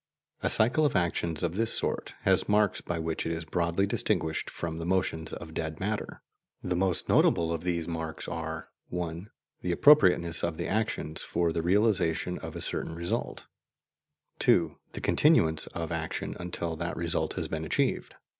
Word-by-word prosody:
A - - +1
cycle 125 +8 +3
of 145 - +2
actions 85 -2 0
of 85 -1 0
this 115 +4 0
sort - - -3
has - - +2
marks 105 -1 +3
by 85 - -3
which 80 0 -2
it - - -1
is 80 0 -3
broadly 85 +3 +1
distinguished 80 -5 -1
from 80 -1 -5
the - - -4
motions 90 -3 0
of 80 -2 -8
dead 80 -1 -3
matter. 105 +2 -3 0.4
The 90 - -1
most 90 -1 +1
notable 85 0 +3
of 80 - -3
these 85 -2 -1
marks 80 -2 -3
are - - -5 0.2
(1) 90 +2 -4 0.3
the 90 - -1
appropriateness 90 - +5
of 85 -2 -1
the 85 - -2
actions 100 -7 -1
for 85 -1 0
the 85 - 0
realization 90 -2 +2
of - - -7
a - - -5
certain 80 - -3
result; 85 +1 -3 0.9
(2) 80 -4 +3 0.2
the - - -6
continuance 80 - +3
of 80 -2 -5
action - - -3
until 85 -1 -3
that 85 +1 -3
result 85 -1 0
has - - -3
been 80 0 -3
achieved. 80 - 0
85 Hz, 170 wpm, -29 LUFS, 80-95 Hz, 0.9 s, appropriateness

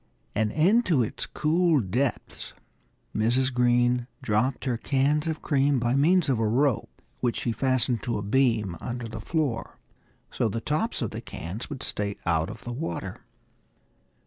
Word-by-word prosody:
And 105 0 +1
into 175 - +3
its 110 - -4
cool 165 0 +2
depths 120 +4 -2 0.6
Mrs. 125 +5 +2
Green 120 0 +2 0.2
dropped 115 +6 0
her 125 -3 +1
cans 145 +5 +1
of 160 -1 -3
cream 140 -1 +2
by 120 0 +1
means 170 +5 +4
of 130 -5 +1
a 110 - +2
rope, 125 +2 +1 0.3
which 120 -2 0
she 120 - 0
fastened 130 -1 +1
to 120 - -2
a 100 - -4
beam 110 -5 +2
under 120 -1 -4
the 110 0 -7
floor, 150 -4 -2 0.5
so 115 - 0
the 115 - -2
tops 155 - -1
of - - -3
the 110 - -5
cans 100 -1 -6
would 145 -4 -6
stay 100 -1 -2
out 80 -1 +1
of - - -9
the 120 - -5
water. 120 - -5
125 Hz, 160 wpm, -26 LUFS, 110-145 Hz, 0.6 s, means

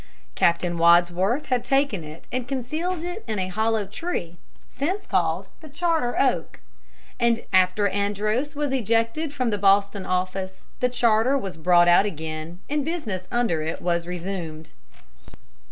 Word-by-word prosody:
Captain 170 - +1
Wadsworth 175 - +4
had 250 -3 0
taken 270 - +1
it 155 +1 -11
and 250 -1 -3
concealed 310 +7 -3
it 355 +5 -5
in 215 -1 -2
a 185 -1 -2
hollow 220 +2 0
tree, 195 - -5 0.3
since 370 +9 -3
called 170 +2 0 0.2
the 310 - -11
Charter 320 -4 0
Oak. 245 -12 0 0.9
After 185 +2 +4
Andros 210 +8 -1
was 290 -1 -1
ejected 230 +5 0
from 255 -5 -1
the 205 - -1
Boston 200 0 +3
office, 185 +1 -2 0.2
the 250 - +2
charter 245 +1 +3
was 195 -8 -5
brought 175 +1 +4
out 175 +4 +6
again, 160 -1 -5
and 295 0 -1
business 230 - -4
under 235 -10 +1
it 160 +1 -3
was 170 -1 -1
resumed. 170 -3 -5
205 Hz, 140 wpm, -24 LUFS, 175-260 Hz, 0.9 s, out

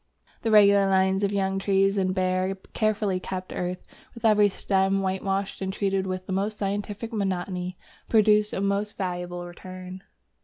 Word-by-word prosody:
The 230 - -1
regular 200 -2 +6
lines 190 +1 +2
of 200 - +1
young 195 -1 0
trees 195 0 +2
in 190 -2 +1
bare, 185 0 0 0.2
carefully 210 -3 0
kept 185 0 -6
earth, 180 0 -4 0.3
with 235 0 -6
every 210 -2 +5
stem 195 0 +1
whitewashed 195 +1 -2
and 190 0 -2
treated 195 -1 -1
with 185 0 -4
the 190 - -4
most 205 +3 -1
scientific 205 +3 -3
monotony, 185 -3 -2 0.3
produce 210 -1 +4
a - - -2
most 200 +1 -1
valuable 175 -1 -4
return. 185 +1 -9
195 Hz, 155 wpm, -26 LUFS, 185-205 Hz, 0.3 s, regular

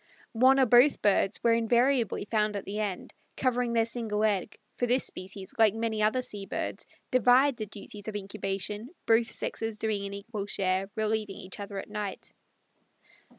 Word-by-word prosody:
One 260 +4 +5
or 265 - +6
both 245 +4 +6
birds 200 0 +3
were 230 - +5
invariably 235 0 +2
found 210 -1 0
at 200 - -4
the 205 +2 -4
end, 200 -4 -3 0.2
covering 245 -2 +1
their 230 -1 +3
single 225 -3 -2
egg, 210 -2 0 0.2
for 245 - +1
this 250 +2 +2
species, 190 +1 -8
like 220 -2 +5
many 225 -1 -1
other 220 +4 +2
sea 200 -4 -8
birds, - - -4 0.2
divide 255 +2 +4
the 215 - -4
duties 205 0 -9
of 215 - -4
incubation, 200 +2 -3 0.2
both 225 0 +4
sexes 225 0 -3
doing 210 -2 -1
an 200 - -7
equal 205 0 -5
share, 190 -1 0
relieving 215 -2 -1
each 185 +2 -9
other 200 0 -6
at 195 - -5
night. 210 -2 -5
215 Hz, 170 wpm, -29 LUFS, 200-235 Hz, 0.2 s, or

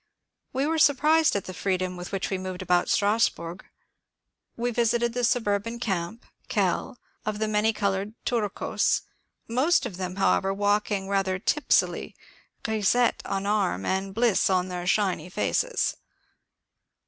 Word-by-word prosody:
We 265 +2 0
were 320 +1 0
surprised 305 +1 +4
at 200 - -2
the 185 - -7
freedom 185 -1 -1
with 180 0 -7
which 195 0 -2
we 190 - -1
moved 185 0 -5
about 180 -1 +2
Strasburg. 200 -5 +1 0.9
We 240 +1 -1
visited 235 0 +1
the 245 0 -2
suburban 230 -1 0
camp 200 0 -3 0.2
(Kehl) - - 0 0.3
of 215 -1 -2
the 220 +1 -1
many 215 +1 +2
coloured 200 0 -2
Turcos, 215 -5 0 0.5
most 260 +6 +2
of 200 -7 -6
them, 185 -1 -4
however, 195 0 +2
walking 205 -1 0
rather 195 -1 0
tipsily, 300 +10 +1 0.5
grisettes 220 +2 +1
on 195 0 -2
arm 205 -2 0
and 190 +1 -2
bliss 230 -5 +3
on 185 -1 +1
their 180 -1 -4
shiny 185 -4 +1
faces. - - 0
205 Hz, 135 wpm, -26 LUFS, 190-235 Hz, 0.9 s, surprised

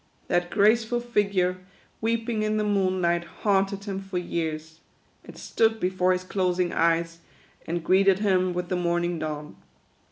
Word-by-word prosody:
That 175 0 +1
graceful 225 +4 +3
figure, 200 -6 0 0.4
weeping 225 0 -1
in 215 0 0
the 215 - +1
moonlight, 185 -4 +1 0.2
haunted 195 -1 +1
him 195 -2 -4
for 195 -1 -5
years. 160 -2 -4 0.4
It - - -13
stood 225 0 +1
before 185 -1 +1
his 180 0 0
closing 180 -2 0
eyes, 165 0 +1 0.5
and 170 0 -2
greeted 190 +1 +4
him 185 -3 +1
with 180 0 -3
the 185 - 0
morning 175 -1 0
dawn. 150 -1 -5
185 Hz, 140 wpm, -26 LUFS, 175-205 Hz, 0.5 s, greeted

